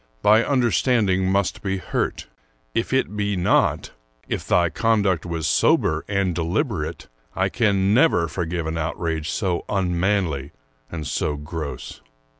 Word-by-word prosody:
Thy 110 +2 +6
understanding 115 -7 +2
must 100 -1 0
be 95 -1 -1
hurt. 90 - -2 0.5
If 115 - -1
it 130 -5 0
be 105 -1 -1
not, 90 -1 +1 0.2
— - - -41
if - - -4
thy 85 -1 +3
conduct 100 -7 +1
was 85 -2 -3
sober - - +2
and 100 -3 0
deliberate, 85 0 -2 0.2
— - - -39
I 95 +1 +1
can 100 -4 +2
never 120 - +4
forgive 85 0 -3
an 80 +1 -3
outrage 80 -1 -2
so 90 -3 -1
unmanly 90 -6 0 0.4
and 80 -3 -5
so 75 +1 -1
gross. 75 -5 -6
95 Hz, 140 wpm, -23 LUFS, 80-105 Hz, 0.5 s, Thy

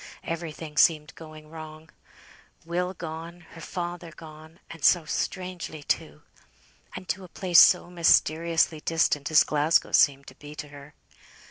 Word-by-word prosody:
Everything 160 -2 -6
seemed 155 -2 +3
going 155 -1 -13
wrong. 155 0 -11 0.7
Will 180 +2 -2
gone; 165 +1 -8
her 165 - -11
father 175 0 -6
gone 155 0 -14
and 165 -3 -11
so 175 -3 +4
strangely 180 -2 -5
too! - - -3 0.7
And 185 0 -8
to 190 - -3
a - - -10
place 175 0 +3
so 180 - +6
mysteriously 165 -1 +2
distant 150 -3 0
as 155 -1 +6
Glasgow 150 +2 +1
seemed 140 -1 +3
to 130 - -13
be 150 +2 -12
to 150 -1 -8
her! 145 +1 -14
160 Hz, 140 wpm, -26 LUFS, 155-170 Hz, 0.7 s, so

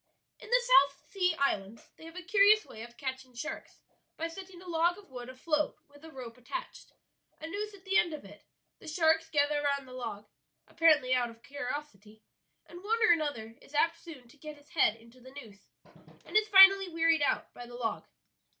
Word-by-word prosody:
"In - - -13
the - - +3
South 280 - +3
Sea 360 -4 +1
Islands 220 -7 -2
they 320 - -14
have 330 +1 -12
a 365 - -7
curious 410 +3 +4
way 220 - -11
of 235 +1 -11
catching 260 -2 -6
sharks 310 +7 -7 0.4
by 330 - -2
setting 370 +1 -11
a 365 - -14
log 345 +1 +1
of 400 -8 -17
wood 245 -1 -8
afloat 300 +4 -2
with 290 +1 -20
a 320 - -11
rope 250 -5 -10
attached, - - -8 0.5
a 315 - -8
noose 410 +4 -5
at 380 -1 -19
the 385 0 +3
end 345 - 0
of 305 -8 -8
it; 205 +1 -14 0.4
the - - -14
sharks 320 0 +2
gather 295 -1 +1
round 280 -2 -1
the 255 - -12
log, 225 -5 -6 0.4
apparently 305 -6 +3
out 245 -1 +1
of 230 0 -16
curiosity, 245 -7 -7 0.4
and 350 +2 -13
one 445 +3 0
or 440 - +6
another 285 -9 -1
is 290 - -15
apt 330 +2 +1
soon 285 -8 -12
to 275 - -20
get 305 +1 -10
his 290 +1 -22
head 225 -9 +2
into 230 +2 -19
the 260 +2 -14
noose, 210 -6 -16 0.6
and - - -12
is 430 0 +4
finally 390 -1 +8
wearied 330 -1 +2
out 285 - -1
by 245 - -10
the 240 - -11
log." 235 -2 -4
295 Hz, 205 wpm, -30 LUFS, 250-345 Hz, 0.6 s, finally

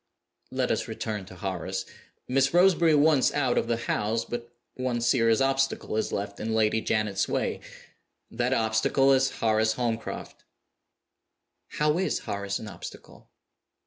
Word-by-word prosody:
"Let - - -1
us - - -1
return 105 -3 -4
to 95 - -12
Horace. 95 0 -4 0.4
Miss 135 +4 +2
Roseberry 175 -3 +5
once 145 -2 +4
out 130 -4 +1
of - - +1
the 115 -1 0
house, 115 0 -1
but 120 0 -6 0.2
one 130 -2 -2
serious 115 -1 +3
obstacle 135 -3 0
is 110 - -1
left 100 0 -4
in 110 +1 -2
Lady 110 0 +2
Janet's 105 -4 0
way. - - -1 0.7
That 120 +2 -1
obstacle 115 +3 +3
is 135 0 +3
Horace 110 0 +1
Holmcroft." 115 -2 -4 1.3
"How 150 +2 +1
is 190 - 0
Horace 100 0 -3
an 110 - -8
obstacle?" 90 -4 -11
115 Hz, 140 wpm, -27 LUFS, 110-135 Hz, 1.3 s, Roseberry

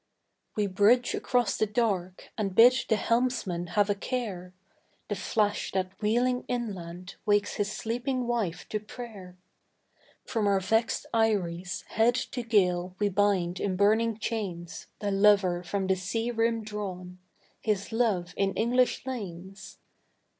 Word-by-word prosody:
We 210 - +1
bridge 205 +6 +3
across 245 -5 +1
the 215 - +1
dark, 200 -5 -1
and 200 -4 -2
bid 240 +4 +8 0.2
the 220 - +4
helmsman 225 -7 0
have 205 -1 +5
a 205 - +2
care, 200 -5 -4 0.6
The 205 - -1
flash 205 +1 0
that 185 -1 -1
wheeling 245 +4 +1
inland 185 -7 -5
wakes 205 0 +1
his 205 0 -1
sleeping 245 +4 -2
wife 230 -8 -2
to 215 - -1
prayer; 205 -4 -10 0.9
From 220 -4 0
our 200 -1 +3
vexed 225 +5 0
eyries, 190 -6 0
head 230 +2 +3
to 255 0 -3
gale, 185 -5 +1
we 205 0 +1
bind 190 -3 +1
in 195 -2 -1
burning 215 +3 +3
chains 195 -7 -4
The 205 -1 -2
lover 195 -3 +4
from 190 +2 -2
the 190 0 +2
sea 225 +6 -2
rim 230 -1 0
drawn 185 -4 -6 0.4
his 210 -2 -1
love 210 -7 0
in 195 -1 0
English 250 +3 +2
lanes. 195 -6 -7
205 Hz, 140 wpm, -28 LUFS, 185-230 Hz, 0.9 s, bid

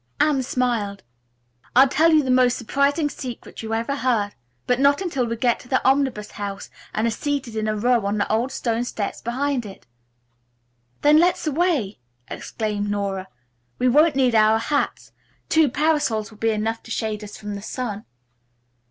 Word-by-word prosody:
Anne 295 -3 +3
smiled. 240 -6 -1 0.7
"I'll 265 +2 +8
tell 315 +5 +3
you 310 -2 +5
the 260 - 0
most 255 -1 +4
surprising 280 +5 +1
secret 255 -4 -7
you 225 0 -3
ever 235 +5 -2
heard, 230 -7 +1 0.3
but 250 0 +1
not 280 +1 +4
until 295 -10 -1
we 230 - -2
get 235 +1 +1
to - - -14
the 260 +1 +2
Omnibus 265 -6 +1
House 200 -1 -6 0.2
and 215 - -1
are 230 - +1
seated 270 -1 -3
in 215 0 -1
a 215 - 0
row 230 -1 +2
on 205 +1 -1
the 205 - 0
old 235 +5 +1
stone 235 -2 -1
steps 215 -4 -4
behind 260 +2 -1
it." 200 -3 -11 1.2
"Then 300 +1 +6
let's 355 +1 +2
away!" 305 - 0 0.3
exclaimed 210 -2 -3
Nora. 200 -2 -2 0.5
"We 255 - +2
won't 300 +3 +4
need 255 -3 +3
our 220 0 +5
hats. 285 +6 -2 0.4
Two 320 -3 +4
parasols 275 -7 0
will 215 - -16
be 225 - +1
enough 220 +1 -1
to - - -15
shade 220 -2 -3
us 205 - -9
from 210 -1 -6
the 200 - -6
sun." 215 -2 -5
240 Hz, 175 wpm, -23 LUFS, 215-280 Hz, 1.2 s, I'll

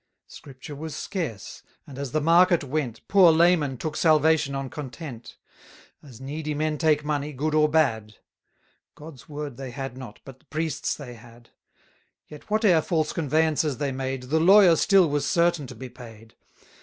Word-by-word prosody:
Scripture 135 +1 -12
was 155 +2 -7
scarce, 145 - -5 0.2
and 135 -1 -11
as 140 -3 -5
the 155 - 0
market 170 +2 +4
went, 140 -4 -3
380 - - -43
Poor 190 -4 +6
laymen 160 -5 +2
took 155 +4 -5
salvation 155 -3 +2
on 135 0 -4
content; 135 -3 -9 0.6
As 130 -6 -14
needy 150 +3 -5
men 155 0 -2
take 150 -2 +2
money, 150 0 -2
good 150 +4 -2
or 155 0 +3
bad: 110 -9 0 0.8
God's 150 -4 -13
Word 145 -4 -6
they 135 -1 -7
had 135 0 -6
not, 125 -4 -10
but 135 -1 -12
th' - - -34
priest's 155 -1 -2
they 130 -5 -10
had. 120 0 -17 0.8
Yet, 150 -1 -13
whate'er 210 -6 +3
false 155 -1 -1
conveyances 155 -2 0
they 140 -2 -2
made, 130 0 -4
The 160 - +3
lawyer 185 0 +6
still 195 -1 +4
was 145 -1 -1
certain 170 -4 +1
to - - -10
be 130 - -8
paid. 115 -3 -14
150 Hz, 170 wpm, -25 LUFS, 130-160 Hz, 0.8 s, Poor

